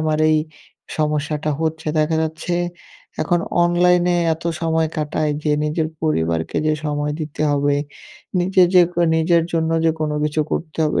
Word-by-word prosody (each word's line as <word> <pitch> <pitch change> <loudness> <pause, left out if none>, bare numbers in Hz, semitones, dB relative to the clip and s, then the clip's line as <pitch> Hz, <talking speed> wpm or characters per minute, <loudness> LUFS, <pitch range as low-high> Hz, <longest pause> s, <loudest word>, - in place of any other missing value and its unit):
আমার 155 -1 0
এই 155 - +4 0.6
সমস্যাটা 150 0 -1
হচ্ছে। 160 0 -2
দেখা 155 +1 +2
যাচ্ছে 160 +2 -3 0.7
এখন 175 -2 +1 0.2
অনলাইনে 175 0 +3 0.2
এত 165 - -14 0.2
সময় 160 -1 +1
কাটাই 150 0 -1
যে 150 - +2
নিজের 155 +1 -1
পরিবারকে 85 - 0
যে 155 - +3
সময় 145 0 -1
দিতে 155 0 -4
হবে, 145 0 +2 0.7
নিজে 185 +1 +3
যে 180 - +8
ক - - -24 0.2
নিজের 165 +1 +3
জন্য 160 -1 0
যে 165 - +5
কোনো 150 -1 -1
কিছু 150 +1 0
করতে 160 -1 -4
হবে, 150 - +1
155 Hz, 155 wpm, -20 LUFS, 150-165 Hz, 0.7 s, যে